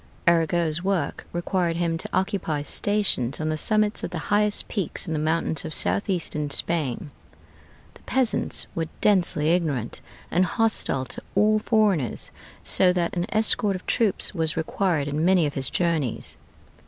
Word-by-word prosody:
Arago's 170 Hz, -1 st, +2 dB
work 195 Hz, -2 st, -2 dB
required 175 Hz, -1 st, -1 dB
him 170 Hz, -1 st, 0 dB
to 165 Hz, -, -4 dB
occupy 185 Hz, -6 st, -1 dB
stations 195 Hz, -, +1 dB
on 155 Hz, 0 st, -1 dB
the 155 Hz, -, 0 dB
summits 215 Hz, +4 st, +2 dB
of -, -, -2 dB
the 175 Hz, -, -5 dB, 0.2 s
highest 210 Hz, 0 st, +2 dB
peaks 195 Hz, -7 st, -1 dB
in 160 Hz, -, -2 dB
the 155 Hz, -, -1 dB
mountains 160 Hz, 0 st, 0 dB
of 155 Hz, -1 st, -3 dB
southeastern 170 Hz, -7 st, 0 dB
Spain. 145 Hz, -2 st, -2 dB, 0.8 s
The -, -, -18 dB
peasants 255 Hz, -3 st, +1 dB
were 165 Hz, -1 st, -2 dB
densely 175 Hz, -6 st, +3 dB
ignorant 150 Hz, -10 st, -1 dB, 0.3 s
and 180 Hz, -, +3 dB
hostile 185 Hz, -8 st, +2 dB
to -, -, -5 dB
all 215 Hz, +1 st, +4 dB
foreigners, 205 Hz, -, +1 dB, 0.3 s
so 185 Hz, -1 st, +3 dB
that 175 Hz, -1 st, -1 dB
an 175 Hz, +1 st, -1 dB
escort 215 Hz, -2 st, +2 dB
of 185 Hz, -, -8 dB
troops 215 Hz, -4 st, +1 dB
was 160 Hz, -3 st, -2 dB
required 160 Hz, -2 st, 0 dB
in 145 Hz, +2 st, -1 dB
many 180 Hz, -2 st, +4 dB
of 145 Hz, -, -2 dB
his 135 Hz, -2 st, -3 dB
journeys. 165 Hz, -9 st, -1 dB
170 Hz, 155 wpm, -24 LUFS, 155-200 Hz, 0.8 s, all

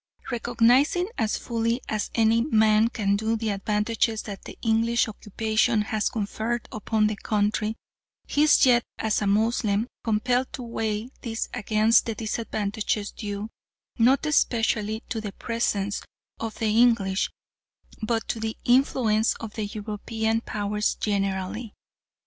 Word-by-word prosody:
Recognising 245 Hz, -, +3 dB
as 220 Hz, -, +1 dB
fully 230 Hz, 0 st, -1 dB
as 215 Hz, -1 st, -2 dB
any 225 Hz, 0 st, +4 dB
man 220 Hz, -4 st, +4 dB
can 200 Hz, -4 st, 0 dB
do 220 Hz, +2 st, 0 dB
the 225 Hz, -1 st, -2 dB
advantages 210 Hz, +2 st, 0 dB
that 200 Hz, -2 st, -8 dB
the -, -, -9 dB
English 230 Hz, +1 st, +2 dB
occupation 215 Hz, +1 st, 0 dB
has 215 Hz, -1 st, -1 dB
conferred 220 Hz, +2 st, -3 dB
upon 215 Hz, 0 st, 0 dB
the 215 Hz, 0 st, 0 dB
country, 210 Hz, +1 st, 0 dB, 0.5 s
he 290 Hz, -, 0 dB
is 305 Hz, -2 st, +6 dB
yet 245 Hz, -2 st, +5 dB
as 220 Hz, -1 st, 0 dB
a 205 Hz, -, 0 dB
Moslem 215 Hz, 0 st, +2 dB, 0.2 s
compelled 245 Hz, +3 st, +1 dB
to 255 Hz, -, -5 dB
weigh 225 Hz, -1 st, -3 dB
these 225 Hz, -1 st, -3 dB
against 220 Hz, 0 st, +3 dB
the 225 Hz, -, -2 dB
disadvantages 215 Hz, -2 st, -2 dB
due, 205 Hz, +1 st, -5 dB, 0.5 s
not 260 Hz, +6 st, +4 dB
specially 225 Hz, -4 st, +1 dB
to 225 Hz, -, -3 dB
the 205 Hz, -2 st, -6 dB
presence 205 Hz, -4 st, -1 dB, 0.4 s
of 225 Hz, -1 st, -4 dB
the 215 Hz, -1 st, 0 dB
English 225 Hz, -5 st, +3 dB, 0.7 s
but 225 Hz, +1 st, -1 dB
to 225 Hz, -, -2 dB
the 220 Hz, 0 st, -3 dB
influence 240 Hz, -3 st, +3 dB
of 220 Hz, -2 st, -8 dB
the 215 Hz, -, -3 dB
European 220 Hz, +2 st, -2 dB
Powers 210 Hz, -1 st, -1 dB
generally. 200 Hz, +2 st, -2 dB
220 Hz, 135 wpm, -25 LUFS, 210-230 Hz, 0.7 s, is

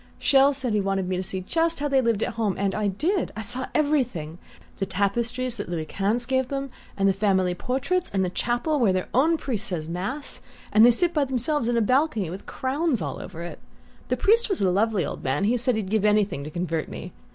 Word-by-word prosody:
Chelles 275 Hz, 0 st, +4 dB
said 255 Hz, -5 st, -1 dB
he 210 Hz, -, +2 dB
wanted 195 Hz, -1 st, -1 dB
me 185 Hz, -, -1 dB
to 180 Hz, -, -1 dB
see 190 Hz, 0 st, -3 dB
just 330 Hz, -, 0 dB
how 290 Hz, -, 0 dB
they 270 Hz, -2 st, +3 dB
lived 230 Hz, -4 st, +1 dB
at -, -, -2 dB
home, 220 Hz, -4 st, -1 dB
and 195 Hz, 0 st, 0 dB
I 210 Hz, -1 st, 0 dB
did; 320 Hz, -, 0 dB
I 220 Hz, -, -5 dB
saw 245 Hz, +4 st, -1 dB
everything: 245 Hz, -, 0 dB, 0.4 s
the 195 Hz, -, 0 dB
tapestries 230 Hz, +6 st, -1 dB
that 205 Hz, -, -5 dB
Louis 165 Hz, -3 st, -3 dB
Quinze 210 Hz, +8 st, 0 dB
gave 260 Hz, 0 st, 0 dB
them, 275 Hz, 0 st, -4 dB, 0.3 s
and 195 Hz, 0 st, +3 dB
the 195 Hz, -, +4 dB
family 190 Hz, -2 st, +1 dB
portraits, 270 Hz, -, -1 dB
and 190 Hz, -1 st, 0 dB
the 180 Hz, -, -3 dB
chapel, 240 Hz, -, 0 dB
where 225 Hz, -6 st, +4 dB
their 185 Hz, 0 st, -2 dB
own 315 Hz, +7 st, +3 dB
priest 240 Hz, -7 st, -3 dB
says 165 Hz, -6 st, -3 dB
mass, 195 Hz, -, -4 dB, 0.3 s
and 215 Hz, -, +7 dB
they 240 Hz, -, +9 dB
sit 340 Hz, +9 st, +2 dB
by 295 Hz, -3 st, +2 dB
themselves 260 Hz, +1 st, 0 dB
in 240 Hz, 0 st, +1 dB
a -, -, +3 dB
balcony 240 Hz, -, +1 dB
with 190 Hz, +2 st, -8 dB
crowns 270 Hz, 0 st, -1 dB
all 145 Hz, -5 st, -4 dB
over 170 Hz, -2 st, -8 dB
it. 175 Hz, -, -7 dB, 0.5 s
The -, -, 0 dB
priest 460 Hz, +3 st, +3 dB
was 390 Hz, -, +1 dB
a 185 Hz, -, +3 dB
lovely 205 Hz, -2 st, +1 dB
old -, -, -6 dB
man 130 Hz, +8 st, 0 dB
he 225 Hz, +5 st, +3 dB
said 245 Hz, 0 st, +1 dB
he'd 205 Hz, -3 st, -3 dB
give 215 Hz, -2 st, +2 dB
anything 210 Hz, -8 st, +2 dB
to -, -, -5 dB
convert 165 Hz, -1 st, -3 dB
me. -, -, -8 dB
220 Hz, 230 wpm, -25 LUFS, 190-265 Hz, 0.5 s, they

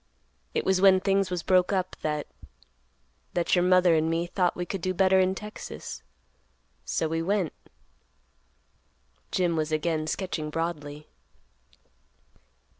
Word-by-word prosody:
It -, -, 0 dB
was 190 Hz, -1 st, +2 dB
when 190 Hz, -1 st, +7 dB
things 195 Hz, 0 st, +1 dB
was 180 Hz, -2 st, -3 dB
broke 185 Hz, 0 st, +3 dB
up, 185 Hz, -2 st, -1 dB
that—that -, -, -6 dB
your 175 Hz, -, +3 dB
mother 180 Hz, -1 st, +5 dB
and 160 Hz, 0 st, +2 dB
me 165 Hz, +1 st, 0 dB
thought 180 Hz, 0 st, 0 dB
we 175 Hz, -, -3 dB
could 190 Hz, +1 st, -4 dB
do 185 Hz, +2 st, -1 dB
better 190 Hz, 0 st, +4 dB
in 185 Hz, 0 st, +2 dB
Texas; 210 Hz, -, -8 dB, 0.8 s
so 160 Hz, -, -1 dB
we 165 Hz, +1 st, -1 dB
went," 190 Hz, -2 st, 0 dB, 1.8 s
Jim 175 Hz, -2 st, +1 dB
was 155 Hz, 0 st, -1 dB
again 155 Hz, 0 st, 0 dB
sketching 160 Hz, -4 st, -3 dB
broadly. 150 Hz, -2 st, -4 dB
170 Hz, 125 wpm, -27 LUFS, 155-185 Hz, 1.8 s, when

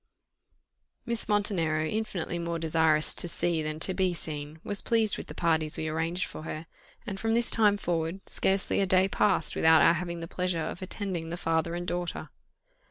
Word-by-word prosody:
Miss 235 Hz, -2 st, 0 dB
Montenero, 170 Hz, -7 st, +1 dB
infinitely 195 Hz, -3 st, -3 dB
more 170 Hz, 0 st, -2 dB
desirous 160 Hz, -1 st, +2 dB
to -, -, 0 dB
see 170 Hz, -1 st, 0 dB
than 155 Hz, 0 st, -4 dB
to 190 Hz, -, +2 dB
be 185 Hz, -1 st, 0 dB
seen, 150 Hz, -1 st, -4 dB
was 205 Hz, -1 st, 0 dB
pleased 225 Hz, -3 st, +1 dB
with -, -, -7 dB
the -, -, -9 dB
parties 160 Hz, -2 st, +2 dB
we 155 Hz, -, -3 dB
arranged 165 Hz, +3 st, -1 dB
for -, -, -8 dB
her 155 Hz, 0 st, -6 dB, 0.4 s
and 195 Hz, -4 st, -5 dB
from 225 Hz, +2 st, 0 dB
this 235 Hz, 0 st, +3 dB
time 210 Hz, -2 st, +4 dB
forward, 170 Hz, 0 st, -3 dB
scarcely 190 Hz, 0 st, +1 dB
a 195 Hz, -, +2 dB
day 185 Hz, +1 st, +4 dB
passed 195 Hz, -4 st, +1 dB
without 160 Hz, 0 st, +5 dB
our -, -, +6 dB
having 170 Hz, 0 st, -4 dB
the 165 Hz, -, -6 dB
pleasure 180 Hz, 0 st, -2 dB
of 175 Hz, -, -6 dB
attending 185 Hz, -3 st, -4 dB
the 170 Hz, -, -4 dB
father 165 Hz, 0 st, 0 dB
and 175 Hz, 0 st, -4 dB
daughter. 175 Hz, 0 st, -4 dB
175 Hz, 185 wpm, -28 LUFS, 160-195 Hz, 0.4 s, our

